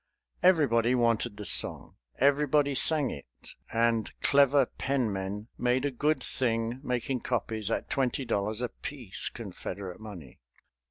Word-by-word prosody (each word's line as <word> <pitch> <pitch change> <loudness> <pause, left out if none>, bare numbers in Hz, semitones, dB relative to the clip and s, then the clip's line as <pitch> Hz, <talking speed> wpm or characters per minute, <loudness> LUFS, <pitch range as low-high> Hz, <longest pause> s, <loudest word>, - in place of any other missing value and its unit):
Everybody 130 -10 +3
wanted 115 -2 0
the 105 - -7
song, - - +4 0.2
everybody 145 +1 +2
sang 145 +1 +3
it; 70 - -9 0.4
and 115 -1 +1
clever 140 -1 +4
penmen 105 -7 -3
made 125 +2 +1
a 145 - 0
good 150 +5 0
thing 115 -1 -1
making 125 -1 -2
copies 115 -3 -2
at - - -2
twenty 135 0 -1
dollars 105 +1 -2
apiece, 125 -3 -3
Confederate 100 -3 -7
money. 95 - -11
120 Hz, 120 wpm, -28 LUFS, 110-140 Hz, 0.4 s, song